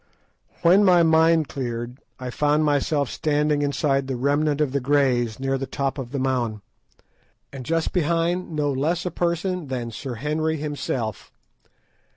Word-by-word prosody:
When 185 +4 +6
my 180 -3 +5
mind 160 -1 +4
cleared 120 -1 -5 0.2
I 130 -1 -5
found 150 +4 +2
myself 145 -1 +1
standing 150 +2 0
inside 140 -1 0
the 135 - -2
remnant 145 +3 +1
of 150 -3 +1
the 140 - 0
Greys 125 -4 +1
near 135 0 -1
the 135 - -4
top 140 +1 -2
of 125 -2 -6
the 140 - -3
mound, 125 -5 -1 0.9
and 135 -2 -7
just 165 +5 -1
behind 170 +1 0
no 150 -3 -1
less 160 +7 -1
a 180 - -2
person 175 0 -1
than 125 -3 -4
Sir 120 +2 -6
Henry 155 +5 -1
himself. 135 -8 -4
145 Hz, 155 wpm, -23 LUFS, 130-160 Hz, 0.9 s, When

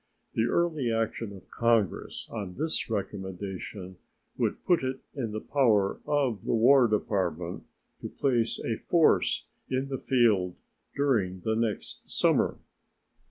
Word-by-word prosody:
The 110 - +2
early 155 -8 +1
action 115 -1 -1
of 95 -2 -13
Congress 115 -5 0
on 100 -5 -5
this 160 -4 -1
recommendation 95 -2 -5 0.4
would - - -1
put 175 - +4
it 130 0 -2
in 120 -6 -3
the 110 - -3
power 110 -8 +2
of 130 -9 +1
the - - +1
War 125 +2 +6
Department 90 -5 -1 0.4
to - - -5
place 120 -4 +1
a 115 - -1
force 165 -2 +3 0.2
in 130 +1 -1
the 135 - -3
field 110 -9 +2 0.4
during 105 -10 +1
the 110 - 0
next 110 -1 -3
summer. - - +3
115 Hz, 130 wpm, -28 LUFS, 100-130 Hz, 0.4 s, War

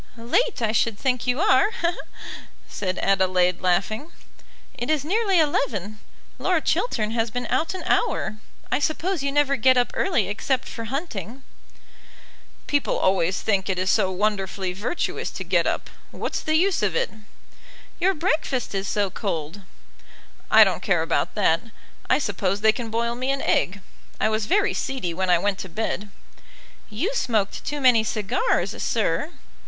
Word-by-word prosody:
"Late; 245 - 0
I 215 - +2
should 225 -1 +1
think 250 -1 -1
you 250 +3 +1
are," 410 0 +4 1.0
said 185 -2 -3
Adelaide 185 -2 +2
laughing. 200 - 0 0.6
"It 240 - -5
is 305 -2 +1
nearly 395 +1 +2
eleven. 215 - 0 0.4
Lord 360 -4 +1
Chiltern 290 - 0
has 225 0 0
been 245 +2 -4
out 330 +4 0
an - - -6
hour. 215 - 0 0.3
I - - +2
suppose 320 +3 -1
you 280 0 -1
never 285 -1 +2
get 255 +3 +4
up 245 - +2
early 250 - +1
except 225 +6 -1
for 230 - -6
hunting." 255 - -5 1.2
"People 285 -1 0
always 185 -1 +1
think 195 -3 0
it 190 - 0
is 185 +1 +1
so 195 -4 +2
wonderfully 195 -1 -1
virtuous 210 - -3
to - - -6
get - - +2
up. - - -2 0.2
What's - - -4
the 315 - 0
use 370 +3 +2
of 195 -5 0
it?" - - 0 0.9
"Your 375 +2 +2
breakfast 305 - -1
is 195 0 -2
so 200 -2 0
cold." 170 -2 -4 0.9
"I - - +9
don't - - 0
care - - +1
about - - -1
that. - - +3 0.5
I - - +5
suppose 200 -5 -1
they 220 0 +6
can 230 0 -5
boil 235 +1 -1
me 255 +2 -3
an 275 0 0
egg. 200 +2 +1 0.4
I 215 - +2
was 215 -1 -1
very 410 - +2
seedy 255 -11 -3
when 185 +2 -1
I 175 - +6
went 195 +2 -1
to 190 - -6
bed." 210 +2 -3 0.8
"You 290 - -2
smoked 220 - 0
too 295 0 -3
many 250 -5 +5
cigars, 220 - 0
sir." - - 0
225 Hz, 160 wpm, -24 LUFS, 195-285 Hz, 1.2 s, I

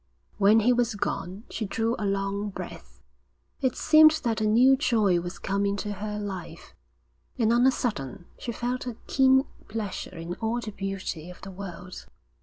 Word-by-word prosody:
When 210 +3 +6
he 245 +4 +4
was 240 -2 +1
gone 195 0 -3
she 220 - -3
drew 225 +3 0
a 205 - -1
long 195 +1 -1
breath. 195 - -9 0.6
It 260 -3 +1
seemed 310 0 +6
that 225 -2 0
a 215 - +2
new 250 +5 +6
joy 220 - +2
was 175 +1 -6
come 200 +1 -1
into 200 +1 -1
her 210 +1 -4
life, 195 -4 -7 0.6
and 230 -1 +3
on 245 +2 +5
a - - +6
sudden 175 - -3
she 240 - -4
felt 245 +2 -3
a 235 -3 -5
keen 265 0 +4 0.2
pleasure 210 -4 -5
in 165 +1 -5
all 225 +2 -1
the 220 -3 -6
beauty 195 -4 -5
of 180 - -11
the 195 - -8
world. 185 -1 -8
210 Hz, 175 wpm, -27 LUFS, 195-240 Hz, 0.6 s, When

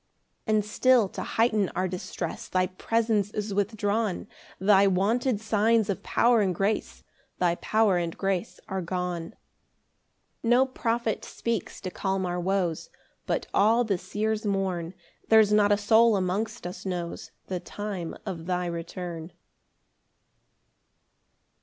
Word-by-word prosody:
7 215 - +3
And 210 -1 +2
still 240 +1 +4
to - - -6
heighten 220 -4 +1
our 185 - 0
distress 180 -2 -5
Thy 185 0 +1
presence 215 +2 0
is 210 -1 -2
withdrawn; 205 0 0 0.3
Thy 195 +1 +5
wonted 210 +5 +1
signs 220 0 +2
of 190 - -4
power 235 -1 +3
and 185 -3 +1
grace, 200 +4 -1 0.3
Thy 175 -1 +2
power 215 +1 +2
and 170 -1 -2
grace 195 +1 -2
are 190 -1 -2
gone. 180 -1 -3 1.1
8 230 - 0
No 250 +2 +5
prophet 235 -3 -1
speaks 230 -4 -3
to 185 - -5
calm 190 0 -1
our 180 0 -2
woes, 180 -3 -1 0.4
But - - 0
all 225 +4 +4
the 200 -6 -1
seers 215 +4 -2
mourn; 190 -4 -1 0.3
There's 220 -2 +6
not 205 -1 +4
a 205 - +5
soul 220 +2 +5
amongst 205 +5 -2
us 180 - -6
knows 175 -3 -4 0.2
The 185 -1 -3
time 190 -2 -5
of 175 -4 -5
thy 180 -1 0
return. 170 0 -5
200 Hz, 135 wpm, -27 LUFS, 180-220 Hz, 1.1 s, There's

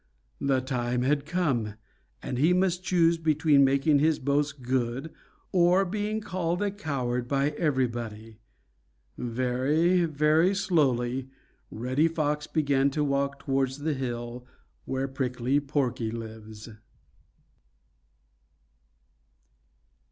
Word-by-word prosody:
The 135 -2 +1
time 125 -1 -1
had 140 +2 0
come, 135 - -1 0.5
and 125 - -3
he 160 +6 +4
must 180 -1 +1
choose 170 -2 +3
between 155 -2 +4
making 140 +2 +3
his 155 +1 +3
boast 140 0 -1
good 130 +4 -2 0.4
or 180 +1 +4
being 210 +3 -2
called 180 -2 -2
a 205 - 0
coward 130 -11 -3
by 140 +2 +1
everybody. 120 -8 -2 0.8
Very, 130 +9 +1
very 155 +4 +2
slowly, 135 -9 +1 0.4
Reddy 130 +7 +1
Fox 150 -2 -1
began 140 -3 +2
to 150 +2 -1
walk 140 0 0
towards 135 -1 0
the 155 0 0
hill 120 -2 -5 0.4
where 135 +1 -2
Prickly 130 0 -1
Porky 135 -5 -1
lives. 110 -1 -8
140 Hz, 105 wpm, -27 LUFS, 125-160 Hz, 0.8 s, he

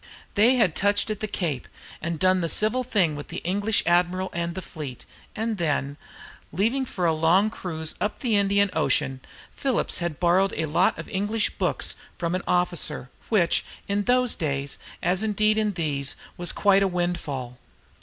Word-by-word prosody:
They 230 +6 +5
had 210 -10 +2
touched 205 +2 +2
at 210 - -4
the 215 - -2
Cape, 160 -10 -3 0.3
and 170 +1 -2
had 160 - -6
done 185 0 +3
the 165 - 0
civil 220 +8 +2
thing 190 -11 +2
with 145 - -7
the - - -7
English 205 +5 +1
Admiral 180 +2 +2
and 170 0 -2
the 190 - -4
fleet, 145 -8 -8 0.3
and 220 -2 -2
then, 145 -4 0 0.6
leaving 230 +9 +1
for 180 -5 -2
a 165 - +3
long 170 +7 +3
cruise 160 -6 -3
up 210 - -1
the 235 -5 0
Indian 200 0 +3
Ocean, 135 -3 0 0.3
Phillips 265 -4 0
had 170 -4 -3
borrowed 185 +3 +3
a 160 - -1
lot 170 +5 +2
of - - -7
English 210 +2 -1
books - - 0 0.2
from 170 0 -2
an 185 - 0
officer, 175 -7 0 0.2
which, 185 -7 +3 0.2
in 200 0 0
those 250 -1 +3
days, 140 -4 -2 0.2
as 180 +2 +2
indeed 215 0 +2
in 210 -1 +1
these, 145 -5 -1 0.2
was 175 0 -2
quite 200 -1 +4
a 195 - +3
windfall. 155 -9 -3
180 Hz, 175 wpm, -25 LUFS, 160-205 Hz, 0.6 s, They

